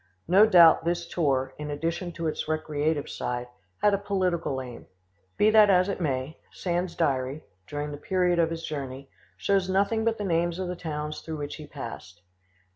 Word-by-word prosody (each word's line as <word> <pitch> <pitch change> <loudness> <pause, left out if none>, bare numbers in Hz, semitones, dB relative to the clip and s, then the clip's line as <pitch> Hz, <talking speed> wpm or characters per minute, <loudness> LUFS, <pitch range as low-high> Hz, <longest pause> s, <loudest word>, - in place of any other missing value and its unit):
No 195 +6 +6
doubt 170 -7 +7
this 170 0 -1
tour, 135 -6 0
in 150 0 -5
addition 165 +4 -3
to 165 0 -5
its 155 - -2
recreative 155 -1 -1
side, 125 0 -4 0.4
had 205 - +5
a 200 - +2
political 180 -8 -1
aim. 125 -2 -9 0.5
Be 215 - +5
that 215 -1 +7
as 185 0 +4
it 195 - -3
may, 135 -1 -2
Sand's 175 0 -2
diary, 135 +2 -1 0.2
during 145 0 -4
the 145 - -6
period 180 +1 +1
of 165 -1 +3
his 165 0 -5
journey, 135 -3 -6 0.3
shows 195 -2 +1
nothing 200 +4 +1
but 225 0 +1
the 210 - -4
names 170 -1 0
of 185 -1 -3
the 180 - -3
towns 150 -2 -5
through 160 -1 -6
which 145 -1 -5
he 155 -2 -10
passed. 105 -8 -9
165 Hz, 185 wpm, -27 LUFS, 145-180 Hz, 0.5 s, doubt